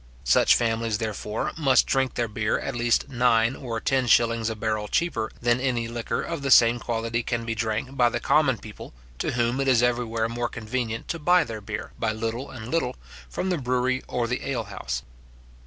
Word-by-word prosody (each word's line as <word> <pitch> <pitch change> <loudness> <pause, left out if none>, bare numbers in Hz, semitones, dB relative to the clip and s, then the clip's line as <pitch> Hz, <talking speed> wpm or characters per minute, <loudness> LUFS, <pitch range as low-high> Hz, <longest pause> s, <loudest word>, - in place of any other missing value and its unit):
Such 65 - +5
families, 115 -2 0
therefore, 110 -1 -3
must 135 -6 +4
drink 135 -1 0
their 120 - 0
beer 105 0 -1
at 135 - -4
least 120 +2 +1
nine 120 -1 +3
or 115 -4 -4
ten 130 +1 +1
shillings 115 0 +3
a 110 - -3
barrel 110 -1 -2
cheaper 115 -6 0
than 120 +1 +3
any 120 -3 0
liquor 115 0 -3
of 165 -3 -4
the 140 - -2
same 120 -1 +6
quality 115 0 -2
can 120 0 -3
be 115 - -1
drank 115 +4 -2
by 120 -3 +4
the - - -2
common - - +3
people, - - -11 0.2
to - - -1
whom 120 +2 0
it 135 - -1
is 120 -3 +4
everywhere 120 -2 0
more 120 +1 -2
convenient 115 0 -4
to 165 - -2
buy 175 +3 +4
their 110 -4 -7
beer, 105 +1 -6
by 110 -1 0
little 115 +4 -4
and 120 -2 -8
little, 130 -7 0 0.3
from 185 - -2
the 175 - 0
brewery 125 0 0
or 120 -1 -1
the 125 +1 -3
ale 125 -4 -1
house. 60 +2 -4
120 Hz, 200 wpm, -25 LUFS, 115-125 Hz, 0.3 s, same